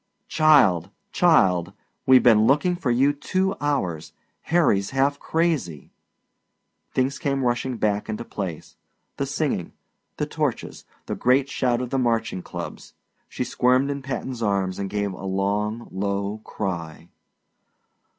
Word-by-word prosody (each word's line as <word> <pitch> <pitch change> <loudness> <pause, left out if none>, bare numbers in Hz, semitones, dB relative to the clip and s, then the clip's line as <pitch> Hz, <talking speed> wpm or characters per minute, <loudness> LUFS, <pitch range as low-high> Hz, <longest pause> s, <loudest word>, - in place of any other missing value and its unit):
"Child, 130 - +4 0.2
child! 95 - +3 0.3
We've 130 -1 +7
been 110 -2 +5
looking 150 +7 +3
for 175 -7 -3
you 135 +4 +3
two 185 +6 -1
hours! 95 - -2 0.4
Harry's 150 - +3
half 140 +2 +1
crazy!" 150 - -1 1.0
Things 130 +2 0
came 135 -1 -1
rushing 120 0 -1
back 105 -1 -1
into 110 +2 -4
place 90 -6 -6 0.4
the 140 - -2
singing, 140 - -2 0.4
the - - -1
torches, - - -3 0.2
the - - -3
great 130 +2 +2
shout 125 -3 0
of 125 - -5
the 135 - +1
marching 115 -6 0
clubs. - - -8 0.3
She - - -3
squirmed 130 +3 +2
in 140 0 -4
Patton's 130 -2 -5
arms 100 -3 0
and 100 -1 -3
gave 100 -1 -2
a 95 - -10
long 100 +4 -1
low 100 +2 -2
cry. 85 -6 -5
120 Hz, 130 wpm, -24 LUFS, 100-140 Hz, 1.0 s, We've